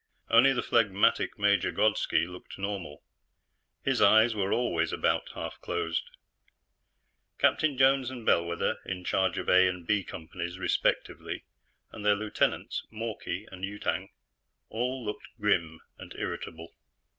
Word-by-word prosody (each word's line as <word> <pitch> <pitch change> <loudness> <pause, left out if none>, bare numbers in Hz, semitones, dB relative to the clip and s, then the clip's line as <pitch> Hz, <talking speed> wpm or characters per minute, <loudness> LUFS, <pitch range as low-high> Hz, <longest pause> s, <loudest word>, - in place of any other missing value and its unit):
Only 120 +4 +7
the 125 - -1
phlegmatic 105 -4 +2
Major 100 -2 +2
Grodski 105 -6 +2
looked 90 0 -10
normal; 95 -7 -5 0.8
his - - +1
eyes 110 +3 +6
were 100 -2 -1
always 85 -9 +1
about - - 0
half - - -6
closed. 80 -2 -2 1.3
Captains 150 -4 +2
Jones 135 -1 +4
and 125 -3 -8
Bellwether, 85 0 +1
in 90 -1 -5
charge 95 +1 +1
of - - -4
A 95 0 +6
and 90 -2 -4
B 105 +2 +1
Companies 85 +2 -6
respectively, 95 - -1 0.5
and 105 - -9
their 105 0 +4
lieutenants, 105 +1 -1
Mawkey 110 -3 -4
and 95 0 -10
Yutang, 100 +1 -2 0.6
all 125 +2 -2
looked 105 - -5
grim 85 -6 +1 0.2
and - - -10
irritable. 80 0 -6
100 Hz, 130 wpm, -29 LUFS, 90-110 Hz, 1.3 s, Only